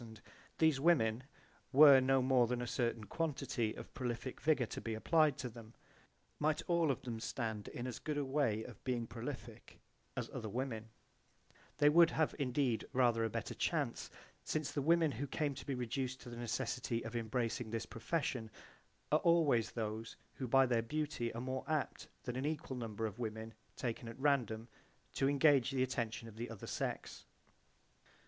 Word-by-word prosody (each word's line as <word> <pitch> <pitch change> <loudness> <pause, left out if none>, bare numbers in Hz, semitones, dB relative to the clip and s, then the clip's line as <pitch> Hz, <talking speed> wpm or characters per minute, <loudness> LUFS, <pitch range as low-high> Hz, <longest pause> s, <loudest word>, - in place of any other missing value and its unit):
These 160 -4 +4
women, 130 -7 +3 0.5
were 140 -1 +9
no 135 0 +3
more 130 -2 +4
than 125 +1 -1
a 120 - -2
certain 120 -2 -1
quantity 120 - -2
of - - -10
prolific 125 0 -4
vigour 145 -4 +3
to - - -6
be 115 -1 -3
applied 155 +5 +3
to 125 - -3
them, 115 -1 -11 0.6
might 155 0 +1
all 170 -3 +3
of 135 - -1
them 115 -3 -4
stand 110 -3 -3
in 120 - -5
as 125 -2 -4
good 150 -1 -3
a 145 - 0
way 130 -6 +1
of 120 - -11
being 125 -3 -1
prolific 115 -1 -8 0.4
as - - -2
other 110 - -4
women: 115 -1 -3 0.9
they 145 0 +5
would 165 +2 +7
have 160 -1 +1
indeed 130 -3 0
rather 120 -3 +3
a 115 - +1
better - - -3
chance - - -1 0.3
since 155 -2 -2
the 145 - -1
women 165 +1 +4
who 140 +4 -4
came 145 +1 -1
to 135 - -9
be 140 - -1
reduced 125 +1 -2
to - - -9
the - - -6
necessity 120 0 -2
of - - -6
embracing 115 0 -1
this 115 0 -2
profession 120 -2 -2 0.6
are 155 - +5
always 160 -10 +4
those 110 0 -4 0.2
who 130 - -4
by 135 +2 +6
their 120 -2 +2
beauty 145 -2 -2
are 115 - -3
more 130 +1 -3
apt 155 -3 -1 0.2
than 125 - -4
an 130 +2 -2
equal 155 -3 -3
number 115 -2 -3
of 110 +1 -5
women 110 -1 -4 0.2
taken 120 -1 -3
at 115 - -8
random 125 -6 +1 0.5
to 135 - +2
engage 140 -3 +5
the 130 -1 +1
attention 115 -3 -2
of 110 -1 -12
the 120 +2 -4
other 115 -4 -8
sex. - - -4
125 Hz, 175 wpm, -36 LUFS, 115-145 Hz, 0.9 s, were